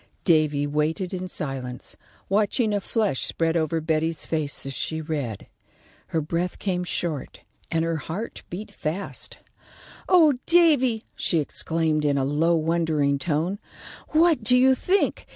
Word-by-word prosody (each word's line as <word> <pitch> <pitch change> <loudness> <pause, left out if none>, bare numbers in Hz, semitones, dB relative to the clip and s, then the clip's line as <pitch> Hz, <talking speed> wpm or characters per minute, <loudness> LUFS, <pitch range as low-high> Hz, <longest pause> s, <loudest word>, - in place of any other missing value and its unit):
Davy 155 -4 +3
waited 155 +6 -1
in 185 0 -3
silence, 135 -7 -5 0.3
watching 210 +2 +1
a 205 - 0
flush 210 - 0
spread 165 0 -1
over 165 0 +1
Betty's 160 0 -1
face 155 -4 -3
as 135 - -4
she 160 +4 -2
read. 145 -9 -4 0.6
Her 160 - -1
breath 170 +4 -2
came 180 -2 -1
short 170 -4 -3 0.3
and 165 -1 0
her 165 -1 -1
heart 165 +10 -6
beat 195 +5 -7
fast. 170 +6 -5 0.7
"Oh, 315 -8 +5
Davy," 285 -10 +4
she 170 - 0
exclaimed, 160 0 0
in 145 -1 +2
a 135 - +1
low, 160 +5 +2
wondering 160 -3 +1
tone. 165 +6 -1 0.5
"What 315 -5 +3
do 250 +3 +5
you 260 +1 +6
think? 375 +9 0
165 Hz, 140 wpm, -25 LUFS, 150-205 Hz, 0.7 s, you